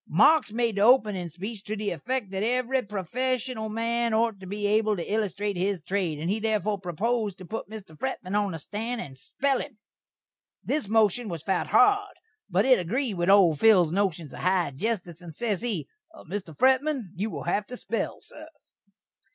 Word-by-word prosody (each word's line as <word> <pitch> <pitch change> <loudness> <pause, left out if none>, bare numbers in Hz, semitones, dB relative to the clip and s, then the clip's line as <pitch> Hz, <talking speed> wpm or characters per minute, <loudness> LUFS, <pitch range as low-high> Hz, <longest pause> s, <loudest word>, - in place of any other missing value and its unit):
Marks 220 - +5
made 230 -2 0
the - - +1
openin' 210 -6 +4
speech 195 +6 -7
to 215 - -3
the 210 -1 -2
effek 225 - -3
that 190 0 -2
every 250 +3 +1
profeshunal 225 +3 -2
man 230 +1 0
ort 225 -2 +1
to 190 - -10
be 205 +2 -3
able 215 0 +2
to 170 - -3
illustrate 205 -1 -1
his 190 +1 0
trade, 175 -1 -2
and 155 +3 -4
he 215 - 0
therefore 215 -2 0
proposed 205 +3 -1
to 185 - -10
put 220 +2 -6
Mr. 205 -7 -10
Fretman 200 - -4
on 205 -3 +1
the - - -4
stan' 225 +9 -4
and 135 -11 -7
spell 275 - 0
him. 280 -7 -7 0.9
This 300 -8 -1
moshun 220 +1 +2
was 165 -3 -5
fout 190 0 0
hard, 405 -1 +4 0.3
but 195 +3 +2
it 260 -4 +5
agreed 230 +7 -1
with 175 0 0
old 180 -7 +6
Phil's 185 -8 +5
noshuns 175 -7 -1
of - - -8
"high 180 -4 +1
jestice," 180 -2 -3
and 165 -3 -10
ses 210 -3 -1
he: 210 - -2 0.4
"Mr. 175 -4 -6
Fretman, 265 - +2
you 200 +4 -2
will - - -6
hav 205 0 -1
to 250 - -7
spell, 225 -3 -3
sur." 310 +1 -12
210 Hz, 185 wpm, -27 LUFS, 185-235 Hz, 0.9 s, old